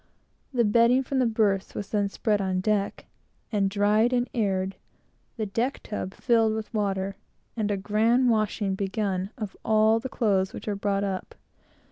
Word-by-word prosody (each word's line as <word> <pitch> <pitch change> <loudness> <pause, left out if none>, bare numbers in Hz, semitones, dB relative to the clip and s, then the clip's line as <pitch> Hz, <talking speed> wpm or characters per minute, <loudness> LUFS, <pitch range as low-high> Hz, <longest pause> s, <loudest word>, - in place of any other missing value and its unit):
The 240 -3 +2
bedding 235 +4 +4
from 265 +1 -1
the 250 - +3
berths 210 -4 0
was 200 -1 -5
then 205 -2 +1
spread 210 0 0
on 185 -1 0
deck, 200 0 -1 0.5
and 200 -3 +1
dried, 210 +4 +2
and 245 0 +1
aired; 195 -4 0 0.6
the 220 - -1
deck 230 +7 -1
tub 195 -3 -5
filled 225 -3 +2
with 220 +1 -6
water; 195 -2 -1 0.4
and 215 -3 -1
a 205 - 0
grand 220 +6 +2
washing 215 -2 0
begun 195 -1 -2
of 215 -5 -5
all 220 +1 +4
the 260 - -5
clothes 195 -6 +1
which - - -8
were 210 - -1
brought 200 0 -1
up. 190 -2 -4
210 Hz, 165 wpm, -26 LUFS, 195-225 Hz, 0.6 s, bedding